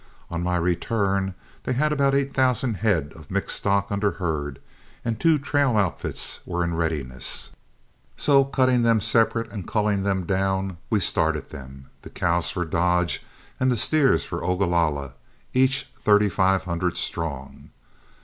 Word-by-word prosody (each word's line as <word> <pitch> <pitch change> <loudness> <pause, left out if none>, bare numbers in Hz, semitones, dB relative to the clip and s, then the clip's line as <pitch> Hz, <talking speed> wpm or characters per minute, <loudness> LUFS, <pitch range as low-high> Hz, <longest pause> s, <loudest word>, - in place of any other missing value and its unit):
On 85 0 -2
my 90 0 0
return 95 +2 0 0.3
they 130 - -2
had 150 +4 +1
about 140 -2 +2
eight 140 0 0
thousand 130 -4 +1
head 85 -8 0
of 80 -3 -14
mixed - - 0
stock 100 0 0
under 100 0 0
herd 75 -6 -3 0.5
and 115 -1 -2
two 165 -2 +4
trail 140 -4 +1
outfits 100 -4 -1
were 85 0 -2
in 85 0 -1
readiness, 75 -6 -2 0.7
so 140 -2 +4
cutting 130 -2 +2
them 115 -1 +4
separate 115 +2 +1
and 100 -5 -6
culling 105 -2 +1
them 95 -2 0
down, 95 0 -1
we 110 - +2
started 80 -4 0
them, 65 0 -11
the - - -11
cows 85 0 0
for 90 - -2
Dodge 90 +2 +1 0.4
and 130 0 +2
the 120 - +1
steers 135 - +3
for - - -5
Ogalalla, 85 -7 0 0.4
each 130 +1 +2
thirty 105 0 +4
five 95 0 +2
hundred 85 0 -2
strong. 70 -5 -5
95 Hz, 150 wpm, -24 LUFS, 85-115 Hz, 0.7 s, two